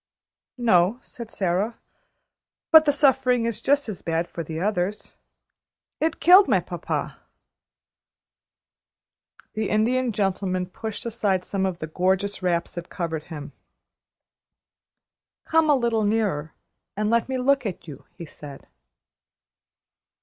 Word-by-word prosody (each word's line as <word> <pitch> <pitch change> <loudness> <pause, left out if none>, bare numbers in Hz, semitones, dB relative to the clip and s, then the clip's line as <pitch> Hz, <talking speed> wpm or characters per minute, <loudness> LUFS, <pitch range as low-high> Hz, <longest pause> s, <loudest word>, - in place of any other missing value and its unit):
"No," 220 -2 +3
said 235 -2 -10
Sara, 195 +3 -1 0.9
"but 320 -1 +8
the 290 - +4
suffering 265 -4 +2
is 230 -1 -3
just 285 +2 +2
as 210 -5 -6
bad 165 +1 -1
for 170 - -6
the 160 +1 -6
others. 200 +1 -2 0.8
It 320 +1 -1
killed 370 +3 +7
my - - +3
papa." - - -4 2.3
The 215 -1 -2
Indian 240 +4 +1
Gentleman 195 -2 -1
pushed 220 +5 -7
aside 205 -5 -1
some 190 -1 -1
of 185 -2 -4
the 155 - -5
gorgeous 190 +5 -1
wraps 170 -2 -1
that 175 0 -7
covered 165 -3 -4
him. 150 -3 -8 1.9
"Come 320 -1 +2
a 295 - +6
little 235 -4 0
nearer, 205 -8 -1 0.4
and 210 +1 0
let 235 +2 +1
me 260 - -1
look 265 -1 +2
at 180 -2 -7
you," 145 - -10
he 170 - -7
said. 145 -2 -11
205 Hz, 125 wpm, -24 LUFS, 175-240 Hz, 2.3 s, but